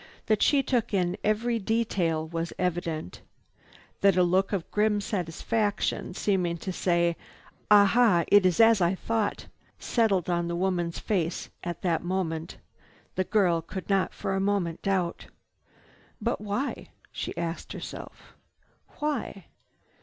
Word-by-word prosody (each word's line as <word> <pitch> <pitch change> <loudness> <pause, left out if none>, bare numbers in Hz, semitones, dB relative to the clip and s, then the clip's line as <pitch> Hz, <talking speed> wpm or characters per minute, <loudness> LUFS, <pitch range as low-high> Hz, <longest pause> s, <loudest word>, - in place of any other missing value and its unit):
That 215 -1 +1
she 280 -2 +4
took 240 -5 0
in 180 -1 +1
every 225 +2 +1
detail 190 -7 0
was 165 +1 -4
evident. 170 - -3 0.8
That 195 -2 +4
a 180 - +5
look 185 +2 +2
of 195 -5 -3
grim 210 0 +2
satisfaction, 205 +1 -2
seeming 180 -5 0
to 185 +3 -5
say, 170 -1 +1 0.5
"Ah 205 -1 +8
ha! 210 -5 +4
It 205 -1 +6
is 185 +1 +2
as 225 -3 +6
I 175 +2 +3
thought!" 220 +1 -2 0.3
settled 205 -7 +1
on 175 -1 0
the 170 - -2
woman's 175 -2 -1
face 175 -5 -2
at 175 -1 -5
that 170 -3 +1
moment, 175 -2 -3 0.6
the 185 - 0
girl 180 -4 +2
could 185 +3 -6
not 195 -1 +2
for - - -3
a 195 - 0
moment 195 -5 0
doubt. 185 -3 -1 0.9
"But - - -1
why?" 210 +7 -3 0.2
she - - -5
asked 170 0 -4
herself. - - -9 0.6
"Why?" 280 - -3
190 Hz, 140 wpm, -27 LUFS, 170-210 Hz, 0.9 s, Ah